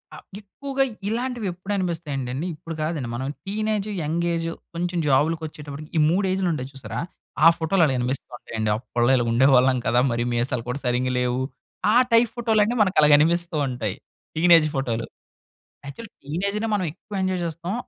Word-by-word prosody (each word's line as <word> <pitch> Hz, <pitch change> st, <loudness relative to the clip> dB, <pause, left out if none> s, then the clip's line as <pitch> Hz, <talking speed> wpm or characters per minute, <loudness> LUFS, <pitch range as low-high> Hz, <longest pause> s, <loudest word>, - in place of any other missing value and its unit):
ఆహ్, -, -, -12 dB, 0.2 s
ఎక్కువగా 270 Hz, +7 st, -2 dB, 0.3 s
ఇలాంటివెప్పుడనిపిస్తాయంటే 185 Hz, -, -3 dB
అండి, 150 Hz, +7 st, -3 dB
ఇప్పుడు 165 Hz, +1 st, -8 dB
కాదండి. 155 Hz, -6 st, -2 dB
మనం 130 Hz, +2 st, -3 dB, 0.2 s
టీనేజ్ 215 Hz, +1 st, -1 dB
యంగేజు 165 Hz, +1 st, -1 dB, 0.2 s
కొంచెం 175 Hz, +1 st, -2 dB
జాబ్‌లకొచ్చేటప్పటికి, 150 Hz, 0 st, -1 dB
ఈ -, -, +4 dB
3 190 Hz, +4 st, +2 dB
ఏజ్‌లుంటాయి 170 Hz, -9 st, -1 dB
చూశారా? 130 Hz, -5 st, -6 dB, 0.5 s
ఆ -, -, +11 dB
ఫోటోలు 170 Hz, +2 st, +2 dB
అలా 140 Hz, -, +1 dB
అనిపిస్తో 125 Hz, +2 st, -3 dB
ఉంటాయండి. 110 Hz, -2 st, -3 dB
అప్పళ్ళో 120 Hz, +1 st, 0 dB
ఇలా 120 Hz, -2 st, +1 dB
ఉండేవాళ్ళం 130 Hz, +1 st, +5 dB
కదా! 120 Hz, +1 st, +3 dB
మరీ 120 Hz, 0 st, 0 dB
మీసాలు 120 Hz, 0 st, -1 dB
కూడా 125 Hz, +3 st, -2 dB
సరింగ 125 Hz, +1 st, +1 dB
లేవు. 125 Hz, +1 st, 0 dB, 0.5 s
ఆ -, -, +3 dB, 0.2 s
టైప్ 230 Hz, 0 st, +5 dB
ఫోటోలన్నీ, 225 Hz, -1 st, +2 dB
మనకలాగ 155 Hz, -7 st, +4 dB
అనిపిస్తూ 170 Hz, +2 st, +1 dB
ఉంటాయి. 120 Hz, -6 st, -3 dB, 0.4 s
టీనేజ్ 165 Hz, -1 st, +6 dB
ఫోటోలు. 120 Hz, -4 st, -1 dB, 0.8 s
యాక్చువల్లీ 205 Hz, +10 st, -9 dB
టీనేజ్‌నే 200 Hz, +9 st, -1 dB
మనం 190 Hz, -3 st, -1 dB
ఎక్కువ 205 Hz, +4 st, -10 dB
ఎంజోయ్ 185 Hz, -1 st, 0 dB
చేస్తాం. 170 Hz, +3 st, -4 dB
160 Hz, 145 wpm, -24 LUFS, 130-190 Hz, 0.8 s, ఆ